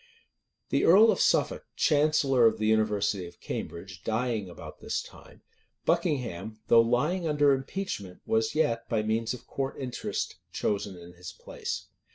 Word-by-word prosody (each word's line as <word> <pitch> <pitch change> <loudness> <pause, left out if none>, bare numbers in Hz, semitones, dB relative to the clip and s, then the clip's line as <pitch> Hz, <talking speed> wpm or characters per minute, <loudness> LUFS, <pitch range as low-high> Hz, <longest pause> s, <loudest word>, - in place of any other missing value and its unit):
The - - +1
earl 215 +6 +7
of - - 0
Suffolk, - - +2
chancellor 145 -5 +4
of 110 - +1
the 110 - -1
university 105 -4 +1
of 85 - -15
Cambridge, 85 0 -6
dying 110 -3 -1
about 85 - -10
this - - -2
time, - - -13 0.4
Buckingham, 110 - -1
though 115 - +8
lying 150 +10 +1
under 145 -2 +4
impeachment 135 - -4
was 110 +3 +1
yet, 115 -7 0
by 110 -3 +1
means 115 +2 0
of 125 - -14
court 135 0 -4
interest, 130 -3 -4
chosen 100 -2 -2
in 85 0 -12
his 90 +1 -9
place. - - -6
115 Hz, 150 wpm, -28 LUFS, 100-135 Hz, 0.4 s, though